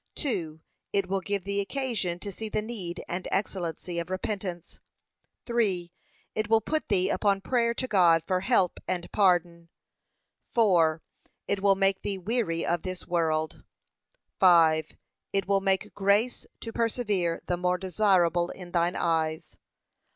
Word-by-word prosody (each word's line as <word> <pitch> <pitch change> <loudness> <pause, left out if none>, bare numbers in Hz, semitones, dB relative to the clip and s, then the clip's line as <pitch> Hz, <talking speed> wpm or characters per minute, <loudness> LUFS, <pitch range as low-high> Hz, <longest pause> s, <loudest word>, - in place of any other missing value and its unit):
2. 165 - -2 0.3
It 200 -2 +1
will 195 0 -1
give 200 0 -2
thee 200 +1 -1
occasion 210 -6 -2
to 200 +2 -6
see 220 +3 -6
the 215 0 -1
need 190 -7 -5
and 180 +1 -4
excellency 175 -3 -2
of 170 +1 -5
repentance. 185 -2 -4 0.7
3. 195 -8 0 0.4
It 215 -1 -2
will 225 0 +5
put 310 +8 -2
thee 190 -2 +2
upon 200 -1 +2
prayer 235 +2 +1
to 255 - -2
God 170 -7 +4
for 185 +1 +1
help 190 -3 +2
and 175 -1 -3
pardon. 175 -4 +2 0.9
4. 170 -8 +3 0.4
It 200 -1 -1
will 200 -1 +4
make 195 0 +1
thee 200 -1 -3
weary 190 -4 -1
of 170 -1 0
this 185 -1 -6
world. 160 -3 -1 0.8
5. 165 -4 +5 0.4
It 195 -2 0
will 195 -1 +2
make 195 -1 0
grace 205 +5 +1
to 225 - -7
persevere 210 -7 0
the 175 - 0
more 180 +1 0
desirable 180 -2 +2
in 180 -2 -9
thine 175 +1 +1
eyes. 160 -1 -1
185 Hz, 145 wpm, -28 LUFS, 175-205 Hz, 0.9 s, will